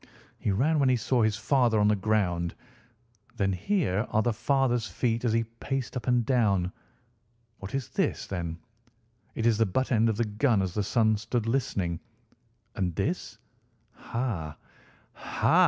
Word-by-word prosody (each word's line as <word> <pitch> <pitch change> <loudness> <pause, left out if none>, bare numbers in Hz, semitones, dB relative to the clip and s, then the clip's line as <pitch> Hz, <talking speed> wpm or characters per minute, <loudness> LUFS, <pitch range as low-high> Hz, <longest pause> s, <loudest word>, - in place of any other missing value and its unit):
He - - -1
ran 140 +11 +2
when 135 -2 +4
he 130 - +4
saw 120 +1 +1
his 110 -2 +2
father 120 -1 +2
on 105 - +4
the 105 - +4
ground. 95 -5 0 0.8
Then 95 -1 +1
here 110 - 0
are 110 - +2
the 120 - +1
father's 120 0 +1
feet 115 -1 -1
as 120 - +2
he 115 +1 +2 0.2
paced 135 -2 -3
up 125 -2 -4
and 125 -2 +3
down. 100 -8 +2 0.9
What 95 +6 -6
is 135 -4 -3
this, - - -1
then? 85 -4 -4 0.8
It 115 - -2
is 115 -2 +3
the 115 - +4
butt 130 +9 -1
end 115 -1 +4
of 110 - -1
the 120 - +1
gun 105 0 +2
as 90 -2 -3
the 105 - 0
son 110 +1 +2
stood 115 +2 -2
listening. 100 -9 -1 0.8
And 90 -6 -1
this? 150 - -2 0.6
Ha, 100 -12 -4 0.6
ha! - - +1
110 Hz, 165 wpm, -28 LUFS, 100-125 Hz, 0.9 s, when